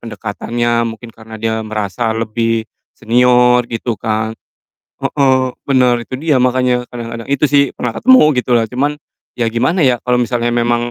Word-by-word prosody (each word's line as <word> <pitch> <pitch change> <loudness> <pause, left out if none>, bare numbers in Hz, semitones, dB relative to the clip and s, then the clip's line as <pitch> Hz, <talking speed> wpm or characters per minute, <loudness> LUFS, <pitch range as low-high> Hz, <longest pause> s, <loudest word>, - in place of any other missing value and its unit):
pendekatannya, 115 +1 -2
mungkin 115 +1 -9
karena 110 0 -13
dia 110 0 -2
merasa 110 +1 -3
lebih 115 0 -1 0.3
senior 125 +1 +3
gitu 115 +1 -3
kan. 110 0 -1 0.7
Heeh, 130 -2 +1 0.2
bener 125 -3 +3
itu 130 - -8
dia 150 -3 +1
makanya 125 -1 +1
kadang-kadang, 115 0 -7
itu 140 - +1
sih, 140 -1 +3
pernah 120 -2 -3
ketemu 260 0 +5 0.2
gitulah. 120 -2 +2
Cuman, 140 +6 -2 0.4
ya 120 - +1
gimana 130 +9 +1
ya, 125 -2 +1
kalau 125 0 +1
misalnya 120 0 0
memang 120 0 0
120 Hz, 150 wpm, -15 LUFS, 115-125 Hz, 0.7 s, ketemu